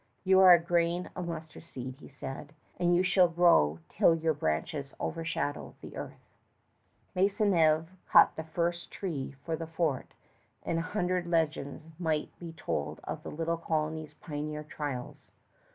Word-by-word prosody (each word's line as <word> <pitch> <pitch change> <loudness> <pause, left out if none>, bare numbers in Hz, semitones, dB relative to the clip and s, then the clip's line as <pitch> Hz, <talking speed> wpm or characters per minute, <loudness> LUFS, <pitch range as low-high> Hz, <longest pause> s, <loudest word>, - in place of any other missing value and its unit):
"You 190 0 +5
are 190 -1 +9
a 175 - +9
grain 170 +1 0
of 180 -1 -4
mustard 160 -2 -6
seed," 130 -5 -8
he - - -12
said, 135 +1 -7 0.3
"and 175 0 +3
you 180 - +3
shall 185 -1 +5
grow 165 - +4
till 165 - +4
your 160 0 +1
branches 140 - -2
overshadow 160 -3 -3
the - - -10
earth." - - -8 0.9
Maisonneuve 180 -5 +3 0.2
cut - - +7
the 160 - -4
first 170 +2 -2
tree 145 -8 -4
for 165 - -1
the 165 0 -6
fort; 160 -5 -2 0.5
and 165 - 0
a 165 +2 -5
hundred 180 -2 0
legends 160 -2 -1
might 160 -3 0
be 170 -1 -7
told 75 - -3
of - - -5
the - - -7
little 165 +2 -1
colony's 155 -2 -2
pioneer 150 0 -5
trials. 145 -4 -6
160 Hz, 150 wpm, -30 LUFS, 150-175 Hz, 0.9 s, are